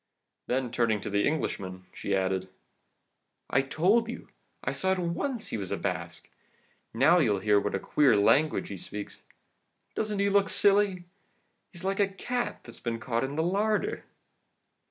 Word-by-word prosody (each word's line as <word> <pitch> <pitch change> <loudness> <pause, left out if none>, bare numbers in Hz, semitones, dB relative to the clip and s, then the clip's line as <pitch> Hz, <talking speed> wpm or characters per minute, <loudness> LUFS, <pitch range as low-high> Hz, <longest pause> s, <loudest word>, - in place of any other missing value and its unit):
Then 125 -1 -1
turning 115 -3 +1
to - - -5
the 100 0 +2
Englishman, 95 -11 -3
she 100 - -2
added: 95 0 -1 1.0
"'I 135 - +4
told 190 +12 +2
you 240 - -6
so. - - -31 0.3
I - - 0
saw 190 - 0
at - - -2
once 215 +8 -2
he - - -2
was 95 -3 -4
a - - 0
Basque. - - -4 0.6
Now 165 +6 +5
you'll 110 -10 +3
hear 105 +1 +3
what 105 - -2
a - - 0
queer 140 -8 +3
language 145 +9 +3
he 100 - -5
speaks. 105 +3 -7 0.7
Doesn't 210 -1 -2
he 200 0 +2
look 200 -1 +3
silly? 200 -2 +3 0.7
He's 175 0 -9
like 195 +1 -1
a 200 - +4
cat 240 +6 -3
that's 115 - -12
been 115 -1 -3
caught 115 0 -1
in 135 +2 -3
the 160 - +1
larder! 210 - 0
155 Hz, 170 wpm, -28 LUFS, -, 1.0 s, Now